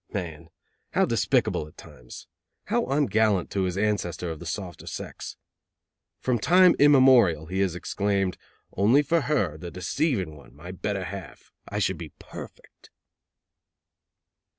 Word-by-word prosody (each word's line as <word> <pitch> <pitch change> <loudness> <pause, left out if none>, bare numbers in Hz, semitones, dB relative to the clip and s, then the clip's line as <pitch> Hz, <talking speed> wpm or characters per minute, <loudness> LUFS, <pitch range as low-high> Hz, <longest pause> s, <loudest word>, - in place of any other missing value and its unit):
Man! 85 -5 -5 0.4
How - - +3
despicable 75 - +1
at 75 - -19
times! 60 0 -12 0.4
How - - 0
ungallant 110 - +2
to 95 -2 0
his 90 0 -2
ancestor 90 -5 -1
of 80 - -7
the 85 - -8
softer 90 +1 -6
sex! - - -7 0.8
From 125 -2 0
time 180 +6 +6
immemorial 130 - +6
he 95 +4 -3
has 95 -3 +1
exclaimed: 100 0 -1 0.4
"Only 120 +9 +4
for 165 +3 +2
her, 105 - 0
the 85 - -6
deceiving 95 - -1
one, - - -16
my 85 +5 -9
better 95 +1 -3
half, 95 +1 -9 0.2
I - - -4
should - - 0
be - - -8
perfect." - - -12
95 Hz, 135 wpm, -26 LUFS, 85-120 Hz, 0.8 s, time